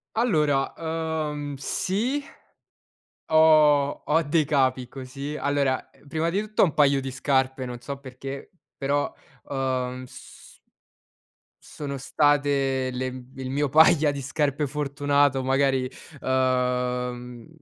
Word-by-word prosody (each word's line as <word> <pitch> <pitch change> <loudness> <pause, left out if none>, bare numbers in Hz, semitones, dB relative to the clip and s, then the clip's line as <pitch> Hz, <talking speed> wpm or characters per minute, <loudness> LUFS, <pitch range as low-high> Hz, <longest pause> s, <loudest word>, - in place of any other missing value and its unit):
Allora, 150 - +2
uhm, 160 -3 -3
sì 230 - -1 1.1
ho 155 -3 +5
ho 160 +2 +3
dei 155 +1 +1
capi 130 -3 +1
così. 135 +3 -7
Allora, 140 -2 0 0.2
prima 160 +3 -1
di 195 +4 0
tutto 215 0 -1
ho - - +8
un 160 - -2
paio 140 -2 +4
di 135 0 -5
scarpe, 130 0 0
non 125 -1 -6
so 140 +3 -6
perché, 135 +1 -8 0.3
però, 145 +1 0 0.4
uhm, 130 -2 -2
s - - -14 1.1
sono 140 -2 -6
state 140 -1 +1
le 130 +1 -2
m 130 0 -8
il 130 -1 -5
mio 145 +2 0
paia 160 0 +5
di 140 -1 -5
scarpe 145 +1 -1
fortunato. 145 -1 +1
Magari, 135 -1 +1 0.3
uhm, 125 -2 -1
140 Hz, 120 wpm, -25 LUFS, 130-150 Hz, 1.1 s, ho